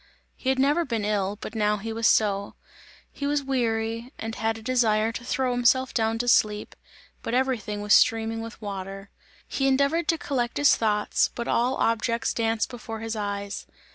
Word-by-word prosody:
He 260 - -3
had 265 - +2
never 290 +6 +3
been 230 -8 -2
ill, 205 -1 -1
but - - -6
now 210 -1 +1
he 225 +2 -5
was 225 0 +1
so; 200 -2 +2 0.6
he 280 - -4
was 290 0 0
weary 230 -2 -1
and 225 0 -5
had 225 0 -1
a - - -10
desire 225 -3 +2
to 240 - -7
throw 255 +1 0
himself 245 +2 +2
down 225 -1 +1
to 245 +1 -2
sleep, 210 -3 +2 0.5
but 230 - -2
everything 250 -5 -1
was 210 0 +3
streaming 225 0 +3
with 230 0 -8
water. 195 -1 -7 0.4
He 270 - 0
endeavoured 280 +5 +2
to 330 - +2
collect 245 -6 -2
his 290 -4 +4
ideas, 210 -2 +2
but 235 - -4
all 250 +3 +1
objects 230 0 0
danced 225 -1 0
before 225 -2 -7
his 225 0 -3
eyes. 200 -1 -4
225 Hz, 180 wpm, -26 LUFS, 215-255 Hz, 0.6 s, his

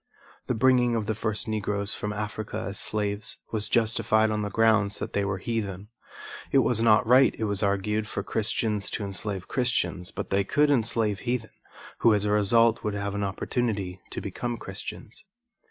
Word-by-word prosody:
The 125 - 0
bringing 125 0 +3
of 110 -2 -1
the 110 - -1
first 110 0 -2
Negroes 105 -1 -1
from 105 - -3
Africa 105 0 -4
as 100 - -5
slaves 105 -1 -1
was 105 -2 0
justified 110 -1 +2
on 105 0 -1
the 105 - -2
grounds 110 -2 +3
that - - -5
they 100 - +1
were 95 -1 -1
heathen. 100 -2 -4 0.6
It - - +4
was 115 -2 +1
not 110 -2 +5
right, 130 +3 +5
it - - -3
was 100 -2 0
argued, 105 +2 0
for 100 - -4
Christians 105 -1 -1
to 105 - -4
enslave 100 -1 -3
Christians, 120 -8 -1
but - - -6
they 100 +1 +2
could 145 +8 +2
enslave 115 -5 +1
heathen, 120 -2 -3 0.5
who 115 -2 +5
as 105 0 0
a 105 - +1
result 115 +2 +3
would 105 -2 -2
have 100 0 -3
an 100 0 -2
opportunity 100 -2 -2
to - - -5
become 120 -1 -4
Christians. 105 - -8
105 Hz, 180 wpm, -26 LUFS, 100-115 Hz, 0.6 s, not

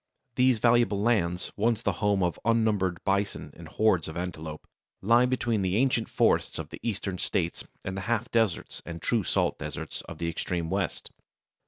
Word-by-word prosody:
These 125 -1 +4
valuable 120 -2 +3
lands, 100 -6 +1
once 110 +1 +1
the - - +2
home 100 -2 +2
of 85 -3 -1
unnumbered 105 -6 +1
bison 100 +1 -1
and - - -11
hordes 100 -7 +2
of 80 - -6
antelopes, 80 -3 -5 0.3
lie 120 +5 +4
between 120 -4 0
the 95 0 0
ancient 120 -1 +2
forests - - +2
of - - -5
the - - -9
eastern 100 -5 -3
states - - -2 0.2
and 95 - -3
the 95 - -3
half 115 -2 0
deserts 110 -7 0
and 85 -1 -7
true 115 +6 +1
salt 90 - 0
deserts - - -5
of - - -7
the 85 - -2
extreme 85 0 -2
west. 95 0 -2
100 Hz, 175 wpm, -28 LUFS, 90-115 Hz, 0.3 s, These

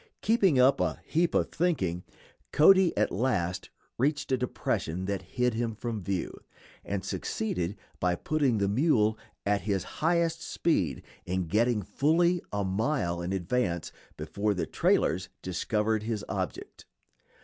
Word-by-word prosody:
Keeping 200 - +3
up 130 +2 +5
"a - - -1
heap 170 +2 +1
of - - +1
thinking," 95 - 0 0.5
Cody 190 +3 +6
at - - +2
last 95 -7 -1 0.3
reached 145 +2 0
a - - +5
depression 95 -7 -2
that 100 0 -2 0.2
hid 125 -1 +2
him 115 -1 -2
from 115 -1 -4
view, 95 -1 -2 0.5
and 100 -1 -3
succeeded, 95 -3 -2 0.2
by 90 -1 +1
putting 140 - +1
the 100 -1 +1
mule 110 -2 +3 0.3
at 100 0 +1
his 100 -3 -1 0.2
highest 165 0 +2
speed, 95 - 0 0.2
in 95 0 -1
getting 110 +4 +1
fully 165 - +2
a 100 0 -1
mile 95 - -1
in 85 +2 -3
advance 90 -2 -1 0.3
before 100 +7 -1
the 90 - -1
trailers 90 +2 +1
discovered 105 +4 0
his 110 -2 -3
object. - - -5
110 Hz, 140 wpm, -29 LUFS, 95-140 Hz, 0.5 s, Cody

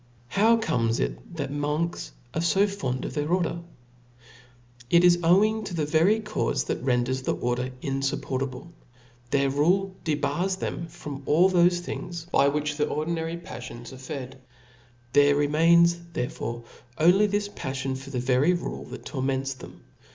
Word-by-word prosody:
How 225 - +4
comes 115 - 0
it - - -4
that - - -3
monks 150 +4 -2 0.2
are 160 - -1
fo 190 +4 +3
fond 135 -11 -3
of - - -5
their 150 +1 -2
order? 175 -2 0 1.3
it 170 +3 +5
is 175 -1 +6
owing 210 +6 +3
to 185 - -5
the 155 -2 0
very 170 +8 +3
caufe 215 -1 -1
that - - -3
renders 125 0 0
the - - -1
order 125 +1 -1
in 135 -1 -1
fup 135 0 -1
portable. 135 +5 -4 0.6
Their 140 +1 +2
rule 185 +7 +2
debars 175 +4 0
them 170 - -4 0.2
of 140 -2 -5
all 175 +6 +5
thofe 175 0 +4
things 175 -1 -6
by 140 - +4
which 150 +1 -1
the 150 - +1
ordinary 165 +2 -2
paflions 120 -6 -9
arc 130 - -11
fed; 130 -2 -7 0.7
there 145 0 +5
remains 170 +4 +4
therefore 120 -2 -4 0.3
only 180 +6 +5
this 205 0 -1
paflion 130 -6 -4
for 135 +1 -9
the 130 -3 -2
very 130 +7 +3
rule 175 - -4
that - - -10
torments 135 -1 -2
them. 130 - -13
150 Hz, 160 wpm, -26 LUFS, 130-175 Hz, 1.3 s, is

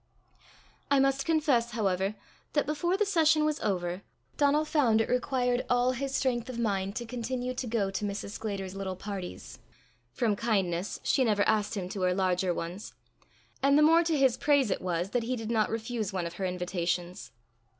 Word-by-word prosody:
I 280 - +4
must 275 0 +1
confess, 285 -8 +2
however, 195 -2 0 0.4
that 295 - +2
before 345 +5 0
the 420 - +2
session 320 -5 +3
was 305 -1 0
over, 180 -2 -2 0.3
Donal 295 +1 +3
found 255 -8 +3
it 225 - +1
required 250 -1 0
all 245 0 +3
his 270 +1 -3
strength 245 -2 0
of 250 - -5
mind 200 -3 -1
to 240 - -3
continue 250 +1 -3
to 255 0 -4
go 215 -4 0
to 195 - -3
Mrs. 200 0 -4
Sclater's 200 -3 -4
little 195 -1 -4
parties 190 -1 -7 0.5
from 215 - 0
kindness 195 -5 -1
she 265 - +2
never 210 -4 +2
asked 215 0 +1
him 185 -2 -3
to 195 - -5
her 180 0 +2
larger 185 -1 +1
ones; 175 +4 -5 0.7
and 280 +1 +4
the 300 - +6
more 330 +2 +6
to 325 -2 +1
his 265 -3 +3
praise 285 -7 +3
it - - -1
was 180 +1 -2
that 245 - +1
he 245 +3 -2
did 225 -1 -4
not 220 -2 +2
refuse 225 -2 -3
one 185 -3 -2
of 170 - -5
her 190 - -3
invitations. 175 -6 -3
225 Hz, 185 wpm, -29 LUFS, 190-265 Hz, 0.7 s, the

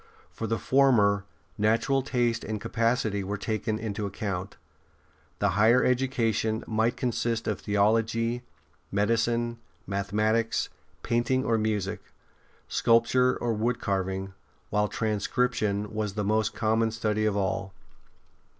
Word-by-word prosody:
For 115 - -4
the 115 +1 0
former, 105 -8 +3 0.3
natural 115 +6 +2
taste 120 -3 0
and 110 -1 -3
capacity 115 -2 0
were 100 +2 -3
taken 110 +1 -2
into 105 -2 -3
account. 100 -2 -4 0.8
The - - +1
higher 110 +7 +4
education 115 -3 +1
might 110 +3 0
consist 120 -2 -1
of - - -1
theology, 115 +3 +1 0.5
medicine, 115 +3 +1 0.3
mathe 100 0 -2
matics, 110 +2 +1 0.3
painting 130 +3 +1
or 115 -1 +2
music, 105 -2 -1 0.7
sculpture 125 +2 +3
or 120 -1 -1
wood 115 +3 0
carving, 95 -1 -2 0.4
while 105 0 +2
transcription 105 -1 -1
was 105 -2 -2
the 105 - -1
most 110 +1 +1
common 110 0 +2
study 110 -1 -1
of 105 -1 0
all. 95 -1 -1
110 Hz, 120 wpm, -27 LUFS, 105-115 Hz, 0.8 s, higher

